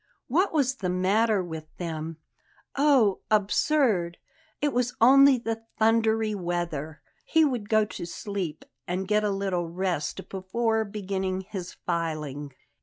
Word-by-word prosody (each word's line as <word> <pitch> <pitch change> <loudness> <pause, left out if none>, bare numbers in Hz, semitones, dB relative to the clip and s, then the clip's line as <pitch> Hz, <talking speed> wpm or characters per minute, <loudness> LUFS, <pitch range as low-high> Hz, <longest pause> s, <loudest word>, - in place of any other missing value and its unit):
What 360 +10 +2
was 270 -4 +1
the 185 -6 -2
matter 195 +3 +2
with 160 -2 -7
them? 165 -2 -5 0.6
Oh, 270 -9 +4
absurd! 210 - +2 0.4
It 290 -1 0
was 245 0 0
only 275 +3 +7
the 225 -1 -3 0.2
thundery 220 -1 +2
weather. 170 -5 -3 0.2
He 320 -1 +3
would 240 -7 -2
go 215 -1 +4
to 175 - -7
sleep 190 -3 -5 0.2
and 185 +2 -2
get 210 +1 +2
a 210 - +1
little 190 -4 -1
rest 180 0 -2
before 220 +4 -1
beginning 190 -2 -3
his 190 -2 -7
filing. 155 -4 -3
200 Hz, 130 wpm, -27 LUFS, 175-225 Hz, 0.6 s, only